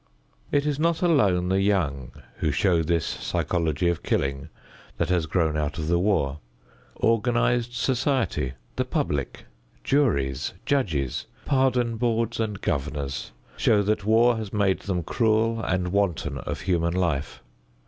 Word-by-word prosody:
It 145 Hz, 0 st, +2 dB
is 150 Hz, -1 st, -1 dB
not 165 Hz, +1 st, +1 dB
alone 100 Hz, -, +3 dB
the 95 Hz, +1 st, +2 dB
young 70 Hz, -11 st, 0 dB, 0.3 s
who 80 Hz, -, 0 dB
show 85 Hz, +3 st, +2 dB
this 85 Hz, 0 st, 0 dB
psychology 85 Hz, -1 st, -1 dB
of 85 Hz, -2 st, 0 dB
killing 70 Hz, 0 st, -1 dB, 0.5 s
that -, -, 0 dB
has 85 Hz, -4 st, +1 dB
grown 80 Hz, -1 st, +1 dB
out 75 Hz, +3 st, -2 dB
of 80 Hz, -1 st, -3 dB
the 85 Hz, 0 st, +3 dB
war. 80 Hz, -8 st, +1 dB, 0.6 s
Organized 120 Hz, +1 st, +1 dB
society, 130 Hz, -, 0 dB, 0.2 s
the -, -, +2 dB
public, 70 Hz, -3 st, -2 dB, 0.4 s
juries, 70 Hz, -, +1 dB
judges, 80 Hz, -, 0 dB, 0.2 s
pardon 125 Hz, -4 st, +1 dB
boards 115 Hz, -1 st, 0 dB
and 105 Hz, -3 st, -2 dB
governors, 70 Hz, -2 st, -3 dB, 0.3 s
show 105 Hz, -2 st, +3 dB
that 105 Hz, 0 st, 0 dB
war 115 Hz, +3 st, +4 dB
has 110 Hz, -3 st, -5 dB
made 100 Hz, -3 st, +1 dB
them 90 Hz, -4 st, -2 dB
cruel 115 Hz, +2 st, +1 dB
and 95 Hz, -3 st, -1 dB
wanton 85 Hz, -8 st, 0 dB
of -, -, -5 dB
human 85 Hz, -2 st, 0 dB
life. 80 Hz, -6 st, -1 dB
95 Hz, 140 wpm, -25 LUFS, 80-115 Hz, 0.6 s, war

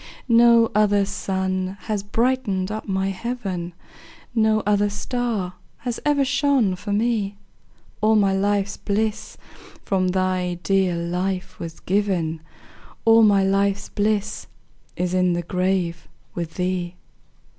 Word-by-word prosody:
No 235 Hz, -1 st, +5 dB
other 205 Hz, -1 st, +3 dB
sun 190 Hz, 0 st, -2 dB
has 210 Hz, -2 st, -2 dB
brightened 210 Hz, -3 st, 0 dB
up 215 Hz, +1 st, -5 dB
my 190 Hz, 0 st, 0 dB
heaven, 190 Hz, -4 st, -4 dB, 0.6 s
No 220 Hz, -2 st, +2 dB
other 205 Hz, 0 st, +2 dB
star 210 Hz, -3 st, -2 dB, 0.2 s
has 240 Hz, -1 st, -4 dB
ever 290 Hz, -2 st, +2 dB
shone 275 Hz, -8 st, +2 dB
for 205 Hz, +3 st, -6 dB
me; 205 Hz, -2 st, 0 dB, 0.6 s
All 220 Hz, +1 st, +4 dB
my 200 Hz, -2 st, +3 dB
life's 200 Hz, +1 st, 0 dB
bliss 215 Hz, +1 st, -2 dB, 0.5 s
from 185 Hz, -2 st, +1 dB
thy 185 Hz, -1 st, 0 dB
dear 190 Hz, 0 st, +2 dB
life 180 Hz, +2 st, -3 dB
was 165 Hz, -1 st, -7 dB
given, 180 Hz, -5 st, -1 dB, 0.6 s
All 225 Hz, 0 st, +7 dB
my 205 Hz, -3 st, +5 dB
life's 200 Hz, +1 st, +1 dB
bliss 210 Hz, 0 st, -1 dB, 0.5 s
is 180 Hz, 0 st, -1 dB
in 180 Hz, -1 st, +2 dB
the 175 Hz, 0 st, -2 dB
grave 180 Hz, -1 st, -1 dB, 0.3 s
with 170 Hz, -2 st, -5 dB
thee. 180 Hz, -1 st, -2 dB
200 Hz, 125 wpm, -23 LUFS, 185-215 Hz, 0.6 s, All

